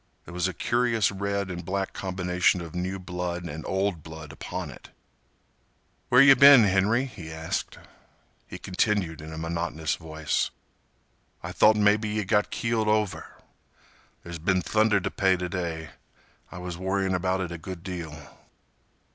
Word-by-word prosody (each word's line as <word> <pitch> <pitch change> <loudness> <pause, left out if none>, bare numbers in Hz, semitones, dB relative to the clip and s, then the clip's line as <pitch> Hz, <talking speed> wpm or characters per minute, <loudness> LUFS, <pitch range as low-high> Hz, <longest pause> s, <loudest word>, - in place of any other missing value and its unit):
There - - -10
was 90 +1 0
a 95 - -4
curious 120 -4 +1
red 100 -1 -2
and 90 0 -6
black 95 +2 -3
combination 90 -1 0
of 85 -2 -8
new 90 +2 -3
blood 90 -1 -4
and 80 -2 -6
old 95 -3 -1
blood 80 -1 -10
upon - - -6
it. - - -14 1.2
"Where 125 +2 +7
yeh 140 0 +9
been, 140 -2 +9
Henry?" 105 +6 +2
he 85 -11 -9
asked. 80 0 -4 0.7
He - - -8
continued 95 -4 -1
in 80 +1 -9
a 80 - -7
monotonous 80 -1 -2
voice, 80 -1 -2 0.9
"I - - -5
thought 110 0 +5
mebbe 105 +1 +3
yeh 105 0 -1
got 105 +1 +1
keeled 115 -2 -1
over. 105 -2 -1 0.9
There 85 -1 -7
been 90 +2 +1
thunder 110 +1 +3
t' 95 - -3
pay 95 -2 +2
t' 90 0 -3
day. 85 -3 -4 0.6
I - - -8
was 90 -1 -6
worryin' 95 0 0
about 95 +1 0
it 90 -2 -4
a 85 - -6
good 85 0 -8
deal." 85 -4 -6
95 Hz, 155 wpm, -26 LUFS, 85-105 Hz, 1.2 s, yeh